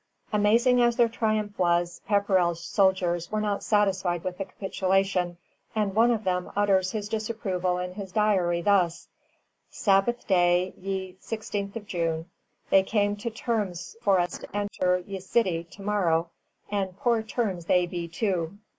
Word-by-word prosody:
] -, -, -27 dB
Amazing 230 Hz, +4 st, +4 dB
as 240 Hz, -1 st, +3 dB
their 235 Hz, -1 st, +4 dB
triumph 215 Hz, -3 st, -1 dB
was, 175 Hz, -1 st, +1 dB
Pepperrell's 185 Hz, -5 st, +2 dB
soldiers 180 Hz, -4 st, +1 dB
were 215 Hz, -, 0 dB
not 210 Hz, -1 st, -1 dB
satisfied 190 Hz, -5 st, +1 dB
with 185 Hz, 0 st, -4 dB
the 195 Hz, -, -2 dB
capitulation, 190 Hz, -2 st, 0 dB, 0.4 s
and 210 Hz, -3 st, 0 dB
one 225 Hz, +3 st, +4 dB
of 225 Hz, -2 st, 0 dB
them 180 Hz, -2 st, -1 dB
utters 195 Hz, -2 st, +3 dB
his 210 Hz, -2 st, -3 dB
disapproval 205 Hz, -5 st, -2 dB
in 180 Hz, 0 st, -4 dB
his 195 Hz, -1 st, -7 dB
diary 180 Hz, -5 st, +2 dB
thus: 180 Hz, -4 st, +2 dB, 0.6 s
"Sabbath 200 Hz, +4 st, +1 dB
Day, 180 Hz, -1 st, +3 dB
ye 190 Hz, -1 st, -5 dB
16th 210 Hz, -1 st, -4 dB
June. 165 Hz, -4 st, -2 dB, 0.5 s
They 195 Hz, -, +7 dB
came 205 Hz, +1 st, 0 dB
to 220 Hz, +3 st, -3 dB
Termes 215 Hz, -7 st, -3 dB
for 195 Hz, -5 st, +3 dB
us 175 Hz, 0 st, -1 dB
to -, -, -11 dB
enter 180 Hz, -3 st, 0 dB
ye 195 Hz, -1 st, -5 dB
Sitty 185 Hz, -3 st, 0 dB
to 195 Hz, +4 st, -13 dB
morrow, 175 Hz, -5 st, +1 dB, 0.4 s
and 195 Hz, -2 st, -2 dB
Poore 235 Hz, +1 st, +2 dB
Termes 215 Hz, -6 st, -2 dB
they 180 Hz, +1 st, +3 dB
Bee 175 Hz, -1 st, -5 dB
too." 180 Hz, 0 st, -2 dB
195 Hz, 155 wpm, -27 LUFS, 180-210 Hz, 0.6 s, They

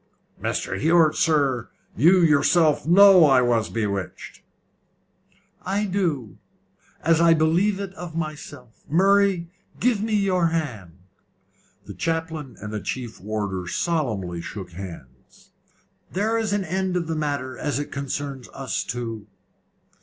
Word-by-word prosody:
"Mr. 95 Hz, -, -2 dB
Hewett, 160 Hz, -, +4 dB
sir, 140 Hz, -7 st, +1 dB, 0.3 s
you 180 Hz, +8 st, +5 dB
yourself 155 Hz, 0 st, +3 dB
know 190 Hz, 0 st, +8 dB
I 135 Hz, -3 st, +5 dB
was 115 Hz, -2 st, +1 dB
bewitched." 100 Hz, -4 st, -4 dB, 1.2 s
"I 200 Hz, +3 st, -1 dB
do; 170 Hz, -, -2 dB, 0.6 s
as 165 Hz, 0 st, +3 dB
I 165 Hz, -1 st, +6 dB
believe 175 Hz, +6 st, +2 dB
it 195 Hz, -1 st, -5 dB
of 175 Hz, -3 st, -8 dB
myself. 150 Hz, -6 st, -7 dB
Murray, 190 Hz, 0 st, +3 dB, 0.3 s
give 235 Hz, -4 st, +1 dB
me 220 Hz, 0 st, 0 dB
your 185 Hz, -4 st, +2 dB
hand." 120 Hz, -, -4 dB, 0.9 s
The -, -, -8 dB
chaplain 160 Hz, -4 st, -3 dB
and 105 Hz, +1 st, -7 dB
the 105 Hz, -, -3 dB
chief 120 Hz, -3 st, -5 dB
warder 100 Hz, -3 st, -3 dB
solemnly 105 Hz, -, -2 dB
shook 95 Hz, 0 st, -8 dB
hands. 90 Hz, 0 st, -12 dB, 0.6 s
"There 215 Hz, +4 st, 0 dB
is 225 Hz, -2 st, -1 dB
an 205 Hz, -1 st, 0 dB
end 185 Hz, +1 st, -1 dB
of 170 Hz, -, -2 dB
the 165 Hz, -, -3 dB
matter 145 Hz, -4 st, -3 dB
as 145 Hz, -3 st, -2 dB
it 145 Hz, -, -4 dB
concerns 140 Hz, -1 st, -5 dB
us 135 Hz, -3 st, -3 dB
two. 115 Hz, -3 st, -5 dB
155 Hz, 130 wpm, -23 LUFS, 120-180 Hz, 1.2 s, know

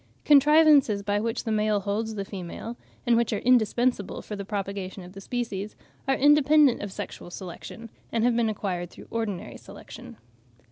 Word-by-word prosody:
Contrivances 295 Hz, -7 st, +5 dB
by 205 Hz, 0 st, 0 dB
which 230 Hz, +2 st, -2 dB
the 225 Hz, -, -3 dB
male 210 Hz, -1 st, +1 dB
holds 215 Hz, +3 st, -2 dB
the 200 Hz, -1 st, -4 dB
female, 195 Hz, +5 st, -7 dB, 0.3 s
and 240 Hz, -, +4 dB
which 235 Hz, -1 st, +1 dB
are 210 Hz, -, 0 dB
indispensable 245 Hz, -2 st, +2 dB
for 210 Hz, -, -6 dB
the 200 Hz, -, -5 dB
propagation 195 Hz, -2 st, -5 dB
of 180 Hz, +1 st, -12 dB
the 195 Hz, -, -10 dB
species, 210 Hz, -3 st, -4 dB, 0.3 s
are 270 Hz, -, +3 dB
independent 295 Hz, -1 st, +5 dB
of 205 Hz, -, -5 dB
sexual 180 Hz, -, -7 dB
selection, 185 Hz, +5 st, -9 dB, 0.2 s
and 230 Hz, -1 st, 0 dB
have 240 Hz, 0 st, +3 dB
been 230 Hz, -1 st, +2 dB
acquired 185 Hz, -5 st, -3 dB
through -, -, -13 dB
ordinary 220 Hz, -6 st, -4 dB
selection. 75 Hz, -, -12 dB
215 Hz, 170 wpm, -26 LUFS, 200-245 Hz, 0.3 s, Contrivances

